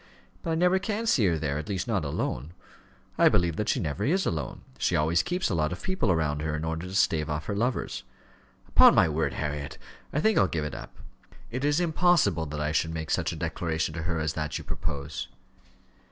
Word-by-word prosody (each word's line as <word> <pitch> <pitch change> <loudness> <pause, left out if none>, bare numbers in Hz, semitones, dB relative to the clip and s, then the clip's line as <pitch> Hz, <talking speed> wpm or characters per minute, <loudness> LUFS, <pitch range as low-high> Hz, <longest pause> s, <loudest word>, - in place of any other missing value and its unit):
"But - - -4
I 160 - +1
never 180 +3 +3
can 215 +3 -2
see 125 - +3
her 85 -2 +2
there 75 -1 -2
at 75 - -7
least, 95 -3 -2
not 105 -7 0
alone. 70 +1 -3 0.7
I - - +7
believe 85 -2 +2
that 105 - -1
she - - +2
never 80 +4 -2
is 180 - +2
alone. 80 -3 -3 0.2
She - - +1
always 80 +3 +3
keeps 180 +2 -1
a 100 - -1
lot 75 -2 +1
of 90 - -6
people 185 - +1
round 75 -2 0
her 80 0 -1
in 75 +1 -3
order 80 +2 -3
to 95 - -6
stave 80 -4 +2
off 75 0 -2
her 100 - -2
lovers. 120 +5 -1 0.7
Upon - - +7
my - - +6
word, 80 +1 0
Harriet, 75 -1 -4 0.3
I 150 - 0
think 220 +6 +3
I'll 95 - +4
give 80 -4 -2
it 75 - -5
up. - - -9 0.6
It 130 +3 -3
is 145 +2 +3
impossible 170 - +3
that 75 +1 -5
I 75 0 0
should 80 +1 0
make 80 -1 -4
such - - +1
a - - -5
declaration 80 -2 -2
to 85 - -4
her 85 0 -1
as 75 0 -1
that 75 -2 -3
you - - -7
propose." 75 -2 -4
80 Hz, 225 wpm, -27 LUFS, 75-125 Hz, 0.7 s, I